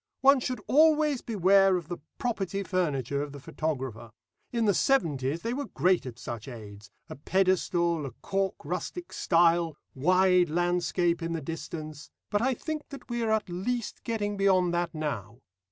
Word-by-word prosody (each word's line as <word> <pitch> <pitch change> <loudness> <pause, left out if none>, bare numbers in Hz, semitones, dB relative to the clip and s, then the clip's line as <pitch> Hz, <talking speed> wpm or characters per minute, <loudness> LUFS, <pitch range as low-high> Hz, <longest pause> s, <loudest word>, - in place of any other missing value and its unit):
One 275 0 +6
should 255 0 -3
always 305 -2 +4
beware 195 -2 +4
of 170 -4 -7
the 175 0 -5 0.2
property 200 -5 -2
furniture 145 -7 -1
of 145 -1 -5
the 145 - -8
photographer. 135 -6 -4 0.4
In 235 -2 0
the 205 - +4
seventies 160 - +1
they 230 +1 -1
were 280 +2 -3
great 180 -6 +1
at 120 -2 -8
such 115 -1 -7
aids 105 -4 -10 0.2
a - - -8
pedestal, 170 -1 +1
a - - -7
cork 195 -1 0
rustic 185 - -5
stile, 170 -2 +3 0.2
wide 180 +4 +3
landscape 175 +1 +1
in 165 0 -2
the 165 - -2
distance, 155 -1 -7 0.2
but 205 - +1
I 260 +1 +1
think 310 +3 -5
that 275 -3 -10
we 240 0 -1
are 225 - 0
at 220 -1 +1
least 210 +7 -3
getting 205 -3 -2
beyond 185 -3 +3
that 175 0 0
now. 120 -9 -4
180 Hz, 165 wpm, -28 LUFS, 155-210 Hz, 0.4 s, One